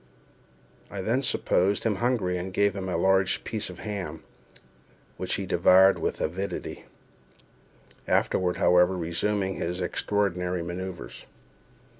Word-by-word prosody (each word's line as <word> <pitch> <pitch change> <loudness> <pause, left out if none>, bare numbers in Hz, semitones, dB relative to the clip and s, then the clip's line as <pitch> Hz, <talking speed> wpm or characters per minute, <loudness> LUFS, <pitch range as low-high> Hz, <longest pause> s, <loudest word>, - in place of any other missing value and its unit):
I 100 - -5
then 115 +7 +1
supposed 100 -6 +1
him 110 -4 0
hungry, 115 -6 0
and 90 +1 -4
gave 100 +1 +2
him 95 -1 -4
a 90 - -1
large 95 +2 +2
piece 110 -3 -4
of 90 - -9
ham, 100 -1 -5 0.9
which - - -1
he - - -3
devoured 95 +1 +5
with - - -2
avidity—afterward, 90 0 -4
however, 90 +1 +4
resuming 95 +3 -1
his 90 +2 -3
extraordinary 90 -1 -1
manoeuvres. 85 -8 -7
95 Hz, 115 wpm, -27 LUFS, 90-100 Hz, 0.9 s, devoured